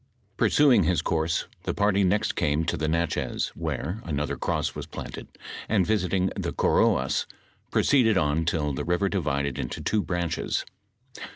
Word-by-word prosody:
Pursuing 130 - +4
his 90 -1 +1
course, 80 0 0 0.2
the - - -3
party 100 -1 +2
next 105 +4 +1
came 75 +2 +1
to 85 - 0
the 80 -1 -2
l^atchez, 85 +1 -1
where 90 +10 -4
another 75 -3 -2
cross - - -1
was - - -7
planted, - - -8 0.4
and 100 -5 +3
visiting 95 -2 +1
the - - -3
Koroaa 65 +1 +2 0.4
proceeded 115 -7 +3
on 75 0 +1
till 75 -3 0
the 65 - -3
river 90 +3 +1
divided 70 -7 -1
into - - -4
two 110 - 0
branches. 90 -3 -2
85 Hz, 150 wpm, -26 LUFS, 75-100 Hz, 0.4 s, Pursuing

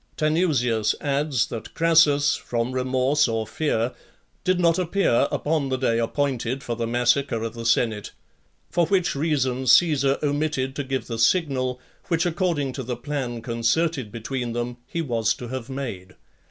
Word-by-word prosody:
Tanusius 140 - +1
adds, 140 -3 0
that 115 - -7
Crassus, 155 -3 +4
from 120 +1 -2
remorse 130 +3 +2
or 115 -1 -1
fear, 125 -3 -1 0.5
did 185 -1 +2
not 170 0 +3
appear 175 -8 +2
upon 150 -2 0
the 130 - 0
day 115 -3 +1
appointed 130 +1 -1
for 120 - -3
the 115 0 -2
massacre 120 0 +1
of 115 -1 -4
the 115 -1 -4
senate; 110 -3 +1 0.6
for 170 -2 +2
which 185 -1 +1
reason 135 -4 0
Caesar 140 -1 +4
omitted 145 -2 -1
to 145 - -2
give 130 -2 -3
the 115 -2 -5
signal, 130 -2 +1 0.3
which, 170 0 +1
according 165 -6 0
to 135 - -5
the 125 -1 -4
plan 120 -3 -4
concerted 120 +2 0
between 120 +1 -4
them, 120 0 -3
he 170 - -3
was 115 -6 0
to 120 - -8
have 130 -1 -5
made. 120 -9 -6
130 Hz, 155 wpm, -24 LUFS, 120-150 Hz, 0.6 s, Crassus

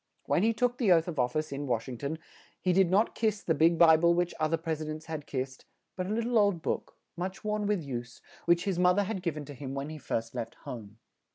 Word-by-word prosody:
When - - +2
he 225 +3 +4
took 245 +2 0
the 220 -7 +3
oath 165 -1 +5
of 160 -5 -4
of 125 0 +2
fice 155 -1 -1
in 140 +1 -4
Wash 120 -1 -1
ing 125 -3 -6
ton, 145 +3 -3 0.4
he 185 - +1
did 190 -1 +4
not 205 +5 +3
kiss 215 -2 0
the 165 - +2
big 165 +1 +4
Bi 160 -1 +8
ble 170 +1 +4
which 175 0 0
oth 155 0 +1
er 165 - +3
pres 160 -1 -3
i - - -3
dents 155 +1 -6
had 155 -2 -6
kissed, 130 -1 -4 0.3
but 185 0 -3
a - - -5
lit 225 +2 0
tle 235 -1 +2
old 200 -5 +2
book, - - -2 0.2
much 185 +2 -4
worn 210 -1 -1
with 205 -5 0
use, 120 -3 -6 0.3
which 170 0 +3
his 190 -3 0
moth 180 +1 +4
er 205 - +4
had 200 -1 -3
giv 170 -4 -2
en 150 - -5
to 145 - -9
him 135 0 -6
when 140 +2 -3
he 155 - -7
first 115 -4 -3
left 115 -2 -5
home. 110 -3 -8
165 Hz, 275 wpm, -30 LUFS, 140-190 Hz, 0.4 s, Bi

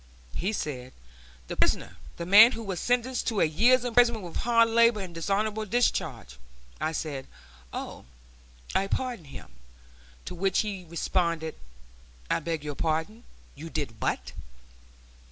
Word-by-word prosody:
He 190 +4 -1
said, 130 -10 -4 0.5
"The - - -4
prisoner, - - 0 0.2
the 170 - -4
man 215 +7 +8
who 230 - -5
was 190 -4 -4
sentenced 245 +1 0
to 220 -4 0
a - - +5
year's 240 +11 +4
imprisonment 235 -3 +3
with 170 - -6
hard 230 0 +4
labor 230 -1 +4
and 185 -3 -6
dishonorable 205 +5 -1
discharge." 240 - -1 0.4
I 155 - -1
said, 145 -4 -4 0.4
"Oh! - - -6 0.7
I 195 - +1
pardoned 240 - -3
him"; 125 - -11 0.7
to - - -6
which 190 +2 +1
he 200 -4 -5
responded, 170 -1 -1 0.8
"I - - +2
beg 165 -2 -3
your 150 -1 -4
pardon; 160 - -2 0.3
you 160 +3 -9
did 140 -9 -4
what?" - - -1
190 Hz, 140 wpm, -28 LUFS, 160-230 Hz, 0.8 s, man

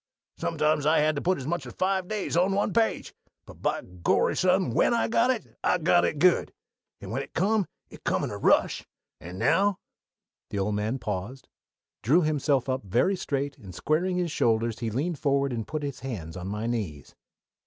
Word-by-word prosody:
Sometimes 150 - +1
I 160 - +4
had 155 +1 +2
to 145 - -2
put 185 +1 +1
as 130 - -6
much 175 +4 -2
as - - -9
five 190 -1 0
days 210 -5 -3
on 185 +3 +3
one 200 0 0
page 225 0 0 0.3
but - - -14
by - - -1
Gorry, 90 -1 0
son, 185 0 +2
when 235 - +3
I 235 - +1
got 245 - +2
it 250 -4 -2
I - - +3
got 175 +1 +3
it - - -1
good, 180 +3 +3 0.5
and - - -8
when - - -1
it - - -11
come 200 +2 +2 0.2
it - - -13
come - - 0
with - - -3
a - - -5
rush - - +3 0.4
and 90 +3 -9
now 200 - +2 0.3
" - - -66
The - - -4
old 100 +2 0
man 105 +5 -1
paused, 105 +3 -5 0.5
drew 155 +10 +4
himself 145 -4 +1
up 130 0 -1
very 120 - +2
straight, 140 -5 -3
and 95 -4 -11
squaring 170 - 0
his 175 -3 -1
shoulders 115 -4 +1
he 115 - -2
leaned 145 +7 -2
forward 140 -2 +1
and 115 -2 -4
put 155 -1 -4
his 140 -3 -4
hands 100 -11 -6
on 90 0 -6
my 105 +3 -3
knees. 105 -12 -4
145 Hz, 205 wpm, -27 LUFS, 115-180 Hz, 0.5 s, I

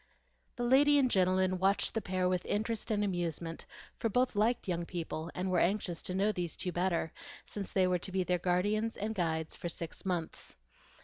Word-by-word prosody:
The 245 - -3
lady 285 +4 +5
and 260 -3 +3
gentleman 185 0 +2
watched 195 +2 +2
the 225 - -1
pair 185 -2 0
with 180 -1 0
interest 220 +1 -1
and 210 -2 +1
amusement; 170 -3 -3 0.3
for 225 - 0
both 250 +2 +1
liked 220 +3 +1
young 175 -2 -1
people, 165 -2 -4
and 185 +1 -1
were 180 - +3
anxious 180 -3 0
to 185 - -3
know 200 +3 +3
these 175 -4 -3
two 180 - -1
better, 175 -2 0 0.3
since 200 -2 -5
they 190 -1 +3
were 180 -1 +2
to 190 - -6
be 190 0 +1
their 180 0 0
guides 205 +6 +1
and 215 +2 -2
guardians 160 -5 -1
for 175 - -4
six 170 -1 -4
months. 175 -4 -3
185 Hz, 195 wpm, -32 LUFS, 175-210 Hz, 0.3 s, lady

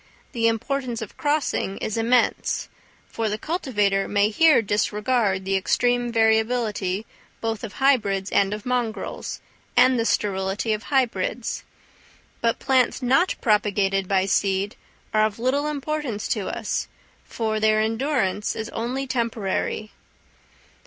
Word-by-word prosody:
the 230 -3 +1
importance 240 +1 -1
of 220 - -7
crossing 290 -9 -1
is 215 - -3
immense; 235 +2 +1 0.4
for 225 -1 -2
the 210 - -2
cultivator 210 - 0
may 205 0 +2
here 315 +7 +5
disregard 210 -1 0
the 195 0 0
extreme 245 +5 +1
variability 220 -3 +1 0.3
both 225 -2 -3
of 215 -4 -6
hybrids 210 -8 +1
and 195 0 +3
of 210 0 -5
mongrels, 245 -3 -3 0.4
and 255 -1 +5
the - - +2
sterility 195 +1 0
of 215 - -4
hybrids; 245 -4 -1 0.8
but 230 0 +1
plants 260 0 +1
not 270 +9 +3
propagated 200 -3 +2
by 190 -1 +2
seed 195 +1 0 0.4
are 215 0 +4
of 215 -1 0
little 265 +5 0
importance 295 -6 -3
to - - -1
us, - - -2 0.4
for 220 -2 -2
their 215 0 +3
endurance 220 -3 0
is 220 0 -4
only 250 +4 -3
temporary. 225 -4 -2
220 Hz, 125 wpm, -24 LUFS, 205-250 Hz, 0.8 s, here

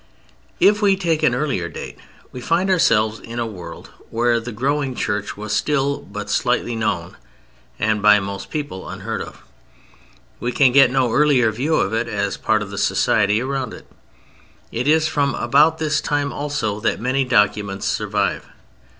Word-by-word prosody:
If 205 +3 +4
we 200 -2 +4
take 170 -5 0
an 120 - +3
earlier 125 - -2
date - - -9 0.3
we 125 - -8
find 175 +8 +1
ourselves 110 -11 +2
in 115 +1 -9
a 120 - -1
world 95 -6 -9 0.2
where 120 +1 +1
the 120 +2 -7
growing 135 +3 -1
Church 105 -2 -3
was 105 0 -4
still 140 -1 0
but 105 -4 -8
slightly 120 +2 0
known 90 -6 -2 0.6
and 105 -1 0
by 105 0 +6
most 100 0 -6
people 145 -12 -5
unheard - - -5
of. - - -10 1.0
We 120 +1 -2
can 135 -3 +4
get 135 -1 +6
no 130 -2 +1
earlier 135 -5 +3
view 140 +9 -1
of 100 - 0
it 115 +1 0
as 100 -1 -2
part 110 -1 0
of 100 - -9
the 100 - -5
society 105 +3 +2
around 135 -1 -3
it. - - -14 0.9
It 120 +4 -2
is 155 +1 +4
from 140 -2 0
about 155 +3 +3
this 155 -2 0
time 145 -1 -1
also 145 -8 -2
that 110 - -1
many 130 +3 0
documents 105 -5 +1
survive. - - -1
125 Hz, 165 wpm, -20 LUFS, 105-145 Hz, 1.0 s, by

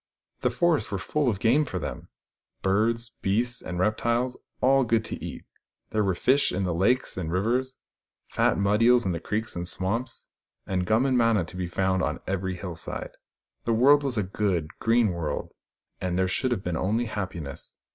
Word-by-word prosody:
The - - +1
forests 170 -3 +1
were 100 - -2
full 135 +8 0
of 100 -4 -2
game 125 +8 +4
for 135 - -4
them - - -5 0.3
— - - -57
birds, 115 +4 +1
beasts 120 +5 0
and 90 - -5
reptiles, 120 +6 +1 0.2
all 135 +1 +4
good 115 -2 +1
to - - -6
eat: - - -7 0.5
there 110 -1 +1
were 95 -2 +1
fish 135 +9 +3
in 95 - -1
the 90 -2 0
lakes 105 +9 +1
and 85 -3 -3
rivers, 120 +8 0 0.5
fat - - +2
mud 100 +2 +2
eels 120 0 +5
in 95 - +1
the 85 - -2
creeks 110 +6 -3
and 85 0 -4
swamps, 105 +8 -3 0.4
and 90 -2 -1
gum 110 +6 +3
and 130 -2 +3
manna 115 -6 +3
to 90 - -11
be 90 -1 -2
found 95 +1 0
on - - -1
every 95 -1 -2
hill 90 -1 -6
side. - - -5 0.5
The 115 - +2
world 140 +6 +6
was 135 -4 -2
a 105 - +2
good, 90 -4 -1
green 115 -1 +3
world, 80 -4 -3 0.5
and 90 -1 -1
there 95 0 +2
should 130 +8 0
have 120 -6 -1
been 90 -2 -2
only 110 +7 0
happiness. 90 -10 -6
105 Hz, 195 wpm, -26 LUFS, 95-120 Hz, 0.5 s, world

